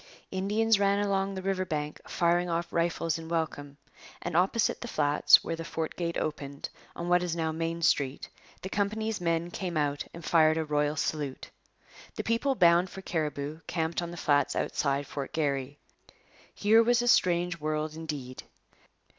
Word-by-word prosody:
Indians 210 +3 +2
ran 200 0 +3
along 195 -1 0
the 190 - -5
river 190 -1 0
bank 150 -4 -4
firing 175 0 +2
off 170 0 -2
rifles 165 -1 0
in 160 0 -9
welcome, 150 -4 -3 0.5
and 175 -2 -3
opposite 190 +6 +2
the 240 - -5
flats 145 -7 +5
where 165 - -3
the 165 - -6
fort 160 -1 -4
gate 170 -1 -2
opened, 140 -2 -4 0.3
on 170 - -5
what 180 0 +4
is 175 -2 -2
now 160 -1 -1
Main 165 +1 -3
Street, 140 -3 +1 0.4
the - - -3
company's 215 +1 -1
men 170 0 0
came 175 -4 -3
out 145 -1 0
and 170 0 -10
fired 155 -1 +4
a 160 - -1
royal 150 0 0
salute. 145 -3 -3 0.6
The - - -3
people 235 +4 +1
bound 175 -2 +5
for 190 - -9
Cariboo 150 -2 -3
camped 165 0 -1
on 170 - -4
the 175 - -8
flats 145 -3 +2
outside 140 0 0
Fort 140 0 -6
Garry. 140 -2 -1 0.8
Here 220 +2 +5
was 240 +1 +3
a - - -1
strange 175 -5 +3
world 155 0 -2
indeed. 145 -6 -6
165 Hz, 170 wpm, -29 LUFS, 150-185 Hz, 0.8 s, flats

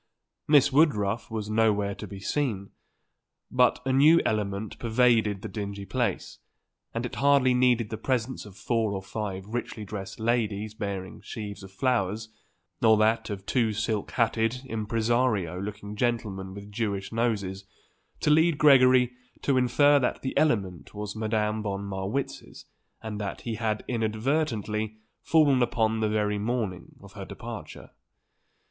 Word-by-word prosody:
Miss 145 -2 +5
Woodruff 115 -8 +2
was 110 -2 -4
nowhere 105 -2 +2
to - - -8
be 100 - -8
seen, 100 -3 -2 0.8
but 125 -1 +3
a 130 - +1
new 150 +5 +6
element 105 -1 -2
pervaded 115 -4 +2
the - - -3
dingy 100 -2 -5
place, - - -2 0.5
and 115 +1 -3
it 125 - -6
hardly 140 -2 +4
needed 125 -3 +2
the 110 - -4
presence 130 +1 -1
of 100 -2 -14
four 110 -1 0
or 95 -1 -4
five 95 -2 -5
richly 110 -1 -5
dressed 100 +1 -7
ladies 110 -2 0
bearing 100 -4 -5
sheaves 105 -2 -7
of 95 -1 -11
flowers, 110 -1 0 0.5
or 110 -1 +6
that 110 +2 +2
of 100 -2 -5
two 115 -2 +1
silk 110 -1 -2
hatted 115 +1 +1
impresario 110 -5 0
looking 105 +1 -6
gentlemen 105 -5 -2
with 100 0 -10
Jewish 100 -2 -2
noses, 100 -5 -1 0.6
to 150 - +3
lead 160 0 +4
Gregory 130 -4 +6 0.3
to 140 - +2
infer 140 +3 +4
that 125 - -1
the 130 - -3
element 95 - 0
was 105 0 -5
Madame 110 0 0
von 100 -1 -3
Marwitz's, 100 +7 -4 0.4
and 105 -1 -5
that 100 -2 -4
he 115 - -4
had, 110 -1 -2
inadvertently, 110 -2 -1 0.2
fallen 145 -5 +4
upon 110 -2 +1
the 110 -1 +1
very 105 -1 0
morning 105 -4 -3
of - - -13
her - - -7
departure. - - -9
110 Hz, 145 wpm, -27 LUFS, 100-125 Hz, 0.8 s, new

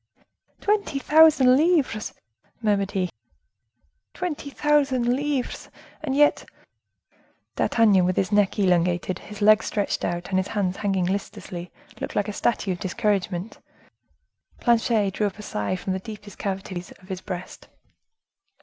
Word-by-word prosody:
"Twenty 405 -8 0
thousand 295 -3 +6
livres!" 295 -8 +1 0.4
murmured 205 -3 +1
he. 185 -3 -1 1.0
"Twenty 335 -5 -4
thousand 280 -3 +2
livres, 280 -2 -3 0.3
and 280 -4 -2
yet—" 295 +1 +4 1.1
D'Artagnan, 210 -5 +4
with 185 0 +1
his 190 +1 0
neck 205 -1 +2
elongated, 180 -2 +1
his 210 0 -7
legs 215 +1 +5
stretched 205 -2 -1
out, 175 0 -3
and 190 - +2
his 190 - -2
hands 195 -3 -1
hanging 195 -3 0
listlessly, 180 -2 -4 0.3
looked - - -5
like 205 - +1
a 210 - -4
statue 210 -3 0
of 175 - -3
discouragement. 190 0 -2 1.0
Planchet 225 -4 +2
drew 210 +2 0
up 200 - -7
a 210 - -9
sigh 105 - -2
from 185 +1 -3
the 190 - -2
deepest 210 0 -10
cavities 190 -2 -4
of 185 - -20
his 185 -1 -4
breast. 185 -2 -7
205 Hz, 135 wpm, -24 LUFS, 185-250 Hz, 1.1 s, thousand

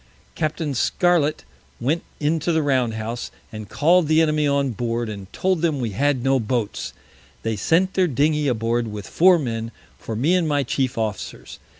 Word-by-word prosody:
Capt. 155 0 -2 0.2
Scarlet 165 +2 +1 0.3
went 145 +8 0 0.2
into 155 +2 0
the 160 -1 +2
Round 130 -5 +1
House, 115 +2 -4 0.2
and 110 -2 -8
call'd 160 +8 +3
the 155 +1 +4
Enemy 155 -2 +2
on 140 -1 +1
board, 115 0 -2
and 100 -2 -8
told 185 -3 0
them 160 -5 +1
we 120 -4 -2
had 135 +4 +1
no 135 0 +3
Boats. 105 - -2 0.5
They 115 -1 -1
sent 170 - +2
their 185 -1 +3
Dingey 150 +1 +1
aboard 115 -1 0
with 105 -2 -6
Four 180 +1 +5
Men 115 -6 -3 0.3
for 115 - -5
me 140 +11 +2
and 180 -3 +2
my 145 -2 +1
chief 130 0 -1
Officers. 110 -3 -4
135 Hz, 175 wpm, -22 LUFS, 115-155 Hz, 0.5 s, Four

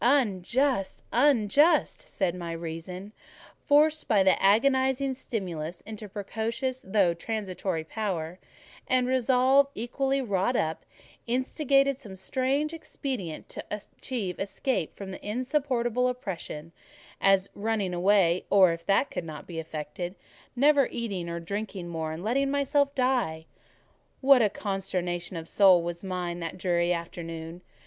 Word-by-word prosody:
"Unjust!—unjust!" 250 - +2
said 185 -4 -1
my 175 -2 -5
reason, 170 +4 -6 0.6
forced 305 +2 +4
by 205 -3 +4
the 190 - +3
agonising 265 +5 +3
stimulus 175 -9 -5
into 215 -1 -8
precocious 225 +6 -3
though 190 -3 +2
transitory 185 -3 -3
power: 180 -2 -3 0.5
and 255 -1 +3
Resolve, 260 +2 +4
equally 270 +4 -1
wrought 210 -1 0
up, 160 -6 -1 0.4
instigated 275 +2 +2
some 210 -8 -10
strange 265 - -1
expedient 255 - -5
to - - -6
achieve 210 -1 -5
escape 200 - -2
from 195 -1 -7
insupportable 250 +2 0
oppression—as 195 -3 -2
running 205 -3 -1
away, 180 -1 +3
or, 190 -4 +6
if 165 0 -8
that 200 +8 +3
could - - -3
not 155 -2 -8
be 165 -2 -6
effected, 160 +3 -5 0.4
never 280 +1 +5
eating 195 -8 -4
or 170 0 -3
drinking 200 +1 -5
more, 160 -2 -3
and 160 +3 -6
letting 270 +6 +1
myself 280 0 +1
die. 250 -12 0 0.7
What 270 -2 +6
a 215 - +4
consternation 185 -3 -3
of 165 0 -7
soul 185 -3 +5
was 170 +1 -5
mine 180 -2 -3
that 165 +1 -5
dreary 175 -1 +1
afternoon! 165 0 -5
200 Hz, 125 wpm, -28 LUFS, 175-255 Hz, 0.7 s, or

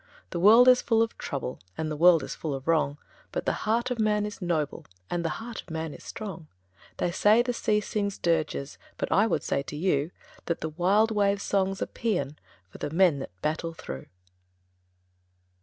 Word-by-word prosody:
The 170 - -2
world 225 +7 +7
is 250 0 +7
full 225 -1 +3
of 230 - -4
trouble, 135 -3 -4 0.2
And 155 -1 -2
the - - -2
world 165 -1 +6
is - - -5
full 150 -4 -4
of 135 +2 -8
wrong, 155 -3 +2 0.3
But - - -3
the - - +2 0.2
heart 235 +3 +1
of 245 - -2
man 210 -1 +2
is 210 -1 -7
noble, 160 -5 -2 0.2
And 175 -1 -1
the 165 - 0
heart 230 0 -7
of - - -20
man 160 -1 -4
is - - -12
strong! 190 -7 -7 0.5
They 175 - 0
say 215 +6 +4
the 245 0 -1
sea 210 -2 +1
sings 200 -1 -2
dirges, 155 -4 -1 0.2
But - - -3
I 210 +3 +4
would - - 0
say - - 0
to 140 - -7
you 150 -2 +1 0.4
That 170 - -1
the 160 - -2
wild 195 +7 +2
wave's 200 -1 +1
song's 195 -1 0
a - - -1
paean 155 -11 -2 0.3
For - - -12
the - - -3
men 165 -2 +3
that 90 -9 -9
battle 165 +2 -2
through. 65 - -8
180 Hz, 200 wpm, -27 LUFS, 155-210 Hz, 0.5 s, world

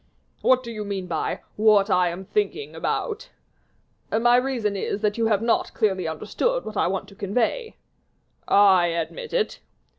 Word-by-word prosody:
"What 255 0 +4
do 235 - -7
you 215 -2 -5
mean 200 -2 -4
by 170 -3 -2 0.2
'what 210 -1 +4
I 180 -1 +3
am 180 +3 -7
thinking 420 - -2
about'?" 460 +1 -3 0.8
"My 240 +2 +4
reason 245 -5 0
is, 200 +1 -3
that 210 -1 +1
you 225 - +2
have 215 -1 +1
not 230 - 0
clearly 190 -6 +1
understood 215 - -1
what 215 - -7
I - - +2
want 190 +1 -2
to 200 - -15
convey." 230 - -1 0.7
"I 190 -3 +5
admit 170 - -4
it." 485 -3 -1
210 Hz, 160 wpm, -24 LUFS, 190-250 Hz, 0.8 s, I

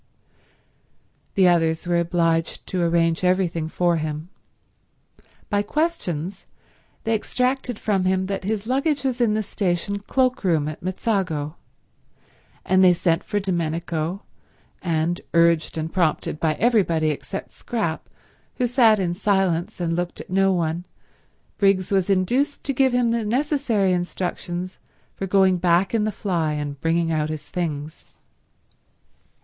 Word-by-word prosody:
The 190 -2 +5
others 165 -2 +2
were 175 -1 +2
obliged 165 -1 0
to 185 - -2
arrange 165 0 +2
everything 180 -3 +1
for 175 0 +1
him. 155 +1 -4 1.2
By 205 -1 +1
questions 205 - -2 0.6
they 225 - 0
extracted 250 +2 -1
from 195 -4 0
him 185 0 +1
that 195 0 -3
his 210 +1 -2
luggage 275 +4 0
was 255 -2 -1
in 220 -3 +3
the 215 - 0
station 200 0 -1
cloakroom 200 - +1
at 155 - -6
Mezzago, 185 -6 -1 1.1
and 190 0 +4
they 180 -1 +7
sent 170 -1 +1
for 205 - -1
Domenico, 170 0 -2 0.6
and, 170 0 0
urged 170 -1 +3
and 160 +1 -3
prompted 160 -3 0
by 155 -2 +1
everybody 180 -10 +2
except 195 +6 -6
Scrap, 205 -10 -3 0.5
who 250 - 0
sat 235 -3 +5
in 180 -3 -1
silence 190 -3 0
and 165 -1 -1
looked 175 0 -3
at - - -10
no 195 +1 +3
one, 170 -1 -1 0.8
Briggs 195 -2 +2
was 195 -1 +2
induced 240 +10 +1
to 275 - -1
give 265 0 +3
him 245 -1 +2
the 230 -1 0
necessary 235 -5 +1
instructions 180 0 -3 0.3
for 195 - -4
going 190 -1 +4
back 175 +3 +2
in 220 -2 +2
the 215 - 0
fly 175 -7 -1
and 145 -1 -4
bringing 165 0 +1
out 155 -1 0
his 155 -1 -5
things. 155 -3 -4
185 Hz, 135 wpm, -23 LUFS, 165-210 Hz, 1.2 s, they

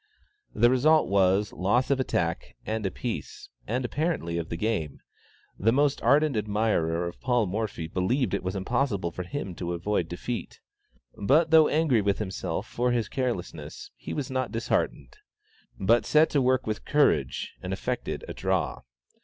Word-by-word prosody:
The 120 +1 +5
result 155 +5 +4
was, 100 +1 +2
loss 120 +9 +1
of 135 - +2
attack 85 -10 -1
and 110 0 -2
a - - 0
piece, 115 +5 -6 0.2
and 125 +3 -1
apparently 120 - -1
of 80 - -5
the 85 - -3
game; 85 -8 -2 0.6
the 110 +4 +3
most 140 +2 +2
ardent 145 +3 +3
admirer 105 -6 0
of 85 - -9
Paul 125 -3 +2
Morphy 100 -3 -3
believed 105 - 0
it 100 - 0
was 95 +2 -3
impossible 100 -3 -1
for 90 - -5
him 95 0 -5
to 85 -1 -3
avoid 85 0 -1
defeat. 115 +7 -5 0.6
But 155 +10 +3
though 160 -1 +7
angry 150 -8 +2
with 100 -1 +1
himself 95 -3 -3
for 125 +1 -1
his 120 -3 0
carelessness, 90 - -4
he - - -8
was 140 -3 -3
not 130 0 -1
disheartened, 75 - -2 0.6
but 115 +5 +3
set 155 +1 +4
to 145 - +2
work 130 0 +2
with 110 -1 -3
courage, 145 0 +1
and - - -5
effected - - -3
"a - - -5
draw." - - -1
110 Hz, 160 wpm, -27 LUFS, 95-130 Hz, 0.6 s, though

